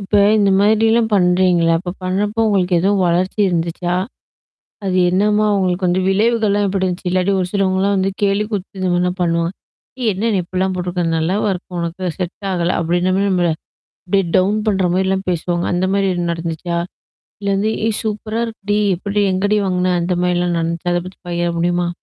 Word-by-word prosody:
இப்ப 200 +1 -6 0.2
இந்த 200 -1 +3
மாதிரிலாம் 220 +2 +3
பண்ணுறீங்கல்ல? 180 -2 +3
அப்போ 180 0 -5
பண்ணுறப்போ 205 +4 -1
உங்களுக்கு 185 -3 +1
எதுவும் 195 +1 +2
வளர்ச்சி 180 +4 0
இருந்துச்சா? 175 0 -1 0.9
அது 185 -1 0
என்னம்மா 210 +3 +2
உங்களுக்கு 185 -1 0
வந்து 180 +1 +1
விளைவுகள்லாம் 205 0 +2
எப்படி 190 0 -1
இருந்துச்சு? 180 0 -3
இல்லாட்டி 185 +2 +1
ஒரு 180 - 0
சிலவங்கலாம் 195 0 +1
வந்து 190 0 +1
கேலி 200 +1 +2
கூத்து 195 -2 -5
இந்த 185 - 0
மாதிரிலாம் 180 +1 0
பண்ணுவாங்க. 170 0 0 0.5
"ஏ - - -2
என்ன 220 +5 -1
நீ - - +2
இப்படிலாம் 185 +2 -1
போட்டிருக்க? 180 0 -2
நல்லாவா 190 +6 0
இருக்கு 180 0 -7
உனக்கு? 170 +2 -4
செட் 185 +2 -5
ஆகல!" 175 -1 0
அப்படின்ற 175 +2 +1
மாதிரி 200 +1 +1
நம்மள 175 -2 +2 0.6
அப்படியே 195 +1 +1
டவுன் 195 +3 +2
பண்ணுற 195 -3 +2
மாதிரிலாம் 190 +1 0
பேசுவாங்க. 175 +1 -1
அந்த 180 +1 +1
மாதிரி 195 -1 +1
ஏதும் 175 -1 -1
நடந்துச்சா? 165 +1 -4 0.6
இல்லை 200 -1 -1
வந்து 215 +2 0 0.2
"ஏய் 220 - -1
சூப்பரா 215 +1 -3
இருக்குடி! 210 -2 -2 0.2
எப்படி 200 +3 -1
எங்கடி 205 +3 +1
வாங்கின?" 180 -1 +1
அந்த 180 +1 0
மாதிரிலாம் 175 -1 +1
நடந்துச்சா? 170 +2 -2
அதை 175 - 0
பத்தி 185 - -13
பகிர 175 0 -1
முடியுமா? 175 0 +1
185 Hz, 170 wpm, -18 LUFS, 175-200 Hz, 0.9 s, இந்த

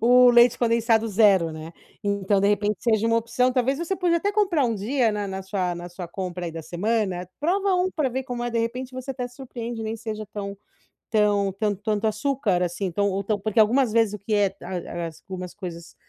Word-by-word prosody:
o 245 +1 +7
leite 240 0 +6
condensado 230 -1 +2
0, 195 -6 +4
né. 155 +1 -8 0.3
Então 200 -1 +1
de 200 - +3
repente 210 0 +1
seja 225 -2 +2
uma 230 0 +3
opção, 250 +2 +1
talvez 265 +2 +1
você 345 +3 -1
pode 350 -2 +2
até 405 +4 0
comprar 375 -9 +2
um 230 -2 +1
dia 225 +2 +1
na 205 -1 -3
na 190 0 -4
sua 185 -3 -2
na 175 0 -7
sua 175 -1 -8
compra 180 -1 -4
aí - - -3
da 165 - -5
semana, 180 +1 -1
prova 380 +5 +1
um 365 +1 +2
pra 295 -5 0
ver 260 +1 -3
como 245 -2 -4
é, 240 - -2
de 230 - -1
repente, 250 +3 -3
você 255 +1 -5
até 250 -1 -4
surpreende, 240 -2 -7
nem 220 +1 -3
seja 215 -1 -5
tão 200 -1 -5 0.5
tão 205 -2 +3
tant 205 -1 -1
tanto 215 0 0
açúcar 215 -5 0
assim, 180 +1 -2
tão 200 +3 +1
ou 195 +1 -2
tão 210 +1 -1
porque 215 +2 0
algumas 235 +2 +4
vezes 225 -3 +3
o - - -10
que 210 +2 -3
é 200 -2 +3
a 175 -1 -5
a - - -2
algumas 180 +3 -8
coisas 170 -4 -8
215 Hz, 220 wpm, -24 LUFS, 195-245 Hz, 0.5 s, o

